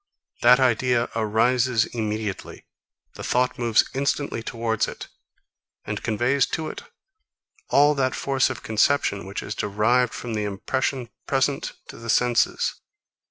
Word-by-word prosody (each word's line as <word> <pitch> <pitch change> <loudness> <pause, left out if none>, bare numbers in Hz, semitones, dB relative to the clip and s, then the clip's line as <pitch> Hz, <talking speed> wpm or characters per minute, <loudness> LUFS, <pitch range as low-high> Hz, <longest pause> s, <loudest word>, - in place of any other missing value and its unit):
That 125 +2 +7
idea 125 -1 +2
arises 115 +2 +2
immediately. 110 -3 -4 0.5
The - - -9
thought 125 0 0
moves 115 -2 +3
instantly 140 -2 -1
towards 115 -1 -1
it, - - -8 0.8
and - - -4
conveys 125 +5 +1
to 160 -1 -4
it - - -7 0.9
all 145 +1 +5
that 130 -2 0
force 135 -1 +1
of - - -6
conception, 110 -3 +1
which 100 - -5
is 100 - -4
derived 110 +5 +1
from 120 -2 -5
the 105 -1 -1
impression 120 +5 -2 0.2
present 135 +1 0 0.2
to - - -9
the 115 0 -9
senses. 120 0 +1
120 Hz, 130 wpm, -24 LUFS, 110-130 Hz, 0.9 s, That